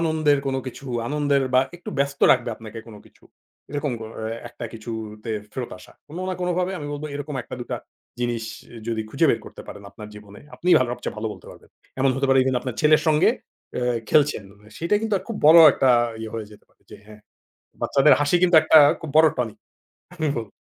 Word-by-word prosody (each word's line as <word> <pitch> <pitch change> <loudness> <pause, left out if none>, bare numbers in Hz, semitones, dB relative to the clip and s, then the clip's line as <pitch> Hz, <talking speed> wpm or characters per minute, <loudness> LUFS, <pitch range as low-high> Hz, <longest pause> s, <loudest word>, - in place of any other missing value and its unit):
আনন্দের 155 -3 +2
কোন 135 0 -1
কিছু, 130 +2 -8 0.2
আনন্দের 145 -2 +1
বা 130 - +7 0.2
একটু 175 - -9
ব্যস্ত 140 0 -1
রাখবে 125 -2 -1
আপনাকে 110 0 -10
কোন 110 - -12
কিছু। - - -25 0.5
এরকম 145 -2 -2
কোন 110 - -7
অ্যা 110 0 -4 0.2
একটা 120 - -9
কিছুতে 110 -1 -7 0.2
ফেরত 125 -2 -5
আসা। 90 - -16 0.2
কোন 165 +4 -8
না 185 - -2
কোনভাবে 180 +1 -1
আমি 145 - -6
বলব 145 +1 -6
এরকম 145 0 -5
একটা - - -8
দুটা - - -4 0.4
জিনিস 120 -2 -2 0.4
যদি 115 -1 -1
খুঁজে 160 +4 +2
বের - - 0
করতে - - -11
পারেন 100 - -10
আপনার 105 +1 -11
জীবনে, 105 -1 -13
আপনিই 180 0 +3
ভালো 130 -2 0
সবচেয়ে 125 - -6
ভালো 110 +1 -4
বলতে - - -14
পারবেন। - - -17 0.3
এমন 135 0 +3
হতে 135 0 0
পারে 135 0 +4
এখানে 130 -1 +1
আপনার 125 -4 -5
ছেলের 155 0 +4
সঙ্গে 155 -1 +4 0.5
আ - - -1 0.3
খেলছেন। 145 -8 +2 0.3
সেটাই 170 +5 +1
কিন্তু 220 -2 0
খুব 225 - -4
বড় 165 +2 +9
একটা 130 - +2 0.3
ইয়ে 110 -1 -6
হয়ে 110 -2 -5
যেতে - - -17
পারে - - -35
যে 105 - -10
হ্যাঁ, 105 0 -14 0.6
বাচ্চাদের 140 +2 +4
হাসি 145 +4 +2
কিন্তু 175 -2 +4
একটা 160 - +6 0.2
খুব 160 - -6
বড় 160 0 +7
tonic। 115 -4 -3 0.6
আমি 160 -3 -2
বলব। 110 -3 -5
135 Hz, 200 wpm, -23 LUFS, 115-155 Hz, 0.6 s, বড়